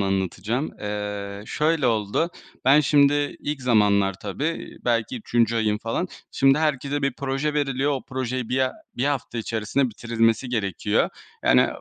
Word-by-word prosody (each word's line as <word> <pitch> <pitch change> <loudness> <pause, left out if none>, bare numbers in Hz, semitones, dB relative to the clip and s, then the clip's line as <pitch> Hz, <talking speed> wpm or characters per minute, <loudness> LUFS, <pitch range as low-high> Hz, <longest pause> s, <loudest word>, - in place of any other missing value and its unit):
anlatacağım. 95 - -1
Eee, 105 -1 -4
şöyle 155 -2 +1
oldu, 115 - +1 0.3
ben 140 +3 +7
şimdi 145 0 +3
ilk 145 -3 -3
zamanlar 100 -5 +3
tabii 145 - -4
belki 120 0 0
3. 115 0 +1
ayım 105 -2 +1
falan. 115 +12 -2 0.2
Şimdi 135 +2 +4
herkese 145 -2 0
bir 140 -2 +1
proje 140 +3 -2
veriliyor. 140 -1 +1
O 135 - -2
projeyi 130 -2 -3
1 130 - 0
ha 130 0 +1 0.2
1 125 - 0
hafta 140 -4 -1
içerisinde 115 +4 0
bitirilmesi 115 +2 +1
gerekiyor. 105 -7 0 0.4
Yani - - +5
125 Hz, 140 wpm, -24 LUFS, 105-140 Hz, 0.4 s, ben